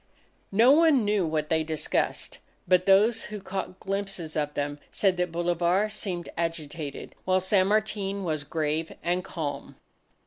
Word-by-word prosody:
No 230 +6 +6
one 300 -6 +5
knew 205 -4 +2
what 155 -1 -1
they 160 -1 +2
discussed. 155 -1 -2 0.3
But 185 +1 +3
those 215 +4 +4
who 210 0 -6
caught 190 -1 -5
glimpses 195 -5 -4
of 150 -1 -1
them, 145 0 -2
said 195 -2 +2
that 180 -1 0
Bolivar 175 +4 +1
seemed 180 -5 -4
agitated, 160 -3 -4
while 185 0 +2
San 185 0 +3
Martin 205 -2 0
was 155 -4 -2
grave 155 +1 -2
and 180 +1 0
calm. 150 -6 -5
180 Hz, 145 wpm, -27 LUFS, 160-200 Hz, 0.3 s, No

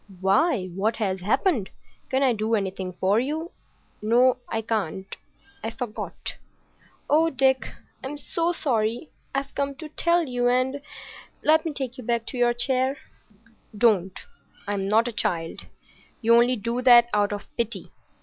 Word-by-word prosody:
"Why, 195 - +2
what 210 +5 0
has 190 -4 -2
happened? 225 - +1 0.4
Can 265 +1 +1
I 260 -3 +4
do 220 +1 0
anything 190 -2 -3
for 195 +4 +3
you? 310 +7 -3 0.5
No, 240 +4 +4
I 225 0 -2
can't. 195 -4 -3 0.5
I 225 - -1
forgot." 230 -1 -6 0.7
"Oh, 320 +2 +4
Dick, 265 -2 +2 0.4
I'm 280 +3 -5
so 335 +3 -1
sorry! 240 -4 -1 0.2
I've 275 0 -2
come 280 0 -2
to 310 +2 -9
tell 340 +3 +2
you, 245 -4 0
and—— 255 +3 +1 0.6
Let 315 +2 +4
me 325 - -1
take 265 -2 -5
you - - -7
back 235 0 0
to 255 - -6
your 240 0 +3
chair." 260 +2 +1 0.8
"Don't! 195 -5 +2 0.5
I'm 200 -1 -1
not 225 +4 +3
a - - -2
child. 175 -7 -3 0.5
You 230 0 +3
only 240 +2 +5
do 235 +3 -2
that 240 -2 +7
out 205 -1 +2
of 205 0 -4
pity. 235 0 -2
240 Hz, 150 wpm, -25 LUFS, 210-270 Hz, 0.8 s, that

